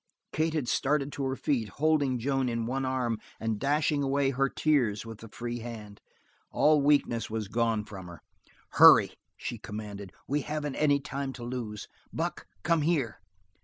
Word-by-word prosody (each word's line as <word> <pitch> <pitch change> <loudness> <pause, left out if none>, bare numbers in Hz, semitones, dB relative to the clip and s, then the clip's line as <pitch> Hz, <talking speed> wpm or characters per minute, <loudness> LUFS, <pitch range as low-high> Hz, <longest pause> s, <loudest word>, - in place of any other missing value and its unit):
Kate 160 +1 0
had 145 -6 -1
started 140 +2 +1
to 140 - -4
her 130 0 -1
feet, 125 -7 -1
holding 145 +1 +1
Joan 135 +1 0
in 115 -1 -2
one 135 +3 -1
arm 125 -4 -1 0.2
and 110 -2 -2
dashing 145 +1 +1
away 135 0 +1
her 135 +1 +1
tears 125 -11 +1
with 115 -1 -9
the 115 - -10
free 120 +2 -5
hand. 110 -3 -8 0.5
All 150 -1 +4
weakness 140 -6 +2
was 110 -2 -3
gone 115 -1 0
from 95 -4 -9
her. 85 -2 -12 0.5
"Hurry!" - - +8 0.3
she - - -5
commanded. 105 -2 -7 0.2
"We 145 +2 0
haven't 150 -1 -4
any 145 -2 +3
time 140 -1 -4
to 125 - -9
lose. 120 -4 -5 0.2
Buck, - - -3 0.2
come 170 -2 +2
here! 145 -8 0
130 Hz, 165 wpm, -29 LUFS, 115-145 Hz, 0.5 s, Hurry